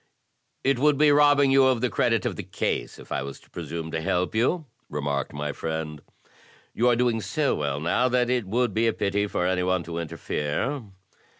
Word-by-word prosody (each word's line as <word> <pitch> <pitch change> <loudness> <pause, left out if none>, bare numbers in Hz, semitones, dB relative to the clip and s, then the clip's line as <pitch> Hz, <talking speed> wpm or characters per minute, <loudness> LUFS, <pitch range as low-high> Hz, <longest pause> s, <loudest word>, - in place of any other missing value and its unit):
"It 135 -2 +2
would 150 +1 +4
be 150 0 +5
robbing 145 -1 +5
you 135 0 +6
of 130 -3 +2
the 125 - +1
credit - - +1
of - - -1
the - - -4
case - - -3
if - - -14
I - - -1
was 70 0 -7
to - - -24
presume 80 -1 -5
to 80 - -2
help 90 +4 0
you," 130 +9 +1 0.2
remarked 70 -1 -2
my 75 0 -3
friend. 80 -2 -4 0.7
"You 120 - +2
are 120 - +4
doing 120 -2 +1
so 135 +9 0
well 70 -1 -2
now 105 +11 +1
that 125 -1 +2
it 125 -5 0
would 120 +1 0
be 115 +3 +2
a 115 - +2
pity 100 0 0
for 90 - -1
any 90 0 +1
one 90 -1 +1
to 85 0 -5
interfere." 85 - -2
105 Hz, 205 wpm, -25 LUFS, 80-125 Hz, 0.7 s, you